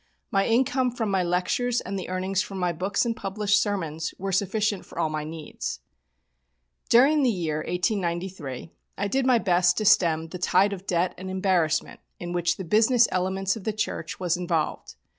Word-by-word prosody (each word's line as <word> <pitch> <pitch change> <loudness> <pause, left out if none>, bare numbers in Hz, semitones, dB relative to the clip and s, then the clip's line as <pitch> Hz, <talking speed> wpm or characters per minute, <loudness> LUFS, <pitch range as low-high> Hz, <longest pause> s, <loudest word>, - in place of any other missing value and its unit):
My 195 0 +2
income 255 +2 +2
from 230 -4 -3
my 190 -1 +2
lectures, 180 +8 0
and 195 +2 -5
the 190 -2 -5
earnings 185 +1 -1
from 195 - -6
my 180 -1 0
books 195 +7 -1
and 230 -1 -1
published 205 +1 +1
sermons, 165 -6 -3
were 195 +1 -3
sufficient 205 +1 0
for - - -15
all 165 -2 +1
my 155 -1 -3
needs. 155 - -6 1.1
During 280 +6 +5
the 260 - +3
year 165 -8 -1
1893 175 - -3 0.3
I 200 - -1
did 265 +5 0
my 250 -2 +5
best 180 -4 +2
to 215 - -1
stem 165 -5 +3
the 180 - -7
tide 190 +3 +3
of 195 0 -9
debt 180 +1 +1
and 190 0 -6
embarrassment 185 -5 0 0.2
in 175 0 -5
which 175 -1 0
the 190 - -5
business 225 +6 +4
elements 190 +2 0
of 220 - -8
the 220 - -1
church 215 - -3
was 180 -2 +1
involved. 170 -3 -2
190 Hz, 180 wpm, -25 LUFS, 175-210 Hz, 1.1 s, During